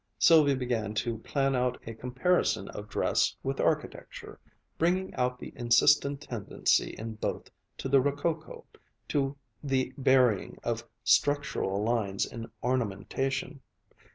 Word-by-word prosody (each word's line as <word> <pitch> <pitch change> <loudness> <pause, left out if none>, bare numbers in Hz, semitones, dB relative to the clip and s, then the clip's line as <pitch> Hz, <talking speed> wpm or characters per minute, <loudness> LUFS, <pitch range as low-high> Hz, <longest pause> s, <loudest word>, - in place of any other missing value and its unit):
Sylvia 145 +4 +6
began 120 -5 -2
to 115 +1 -2
plan 135 +3 0
out 125 0 0
a 115 - -6
comparison 125 - 0
of 105 +1 -8
dress - - +1
with - - -2
architecture, - - -2 0.4
bringing 180 +3 +1
out 125 0 -1
the - - -9
insistent 140 +4 +3
tendency 115 -8 0
in 110 +1 -5
both - - -4 0.3
to - - -4
the 135 0 +5
rococo, 150 +4 -2 0.4
to 140 -1 0 0.3
the 130 -2 0
burying 130 -6 +3
of - - -2 0.2
structural 140 -9 +1
lines 105 -4 0
in 115 -1 -8
ornamentation. 125 +3 -2
125 Hz, 125 wpm, -29 LUFS, 115-140 Hz, 0.4 s, Sylvia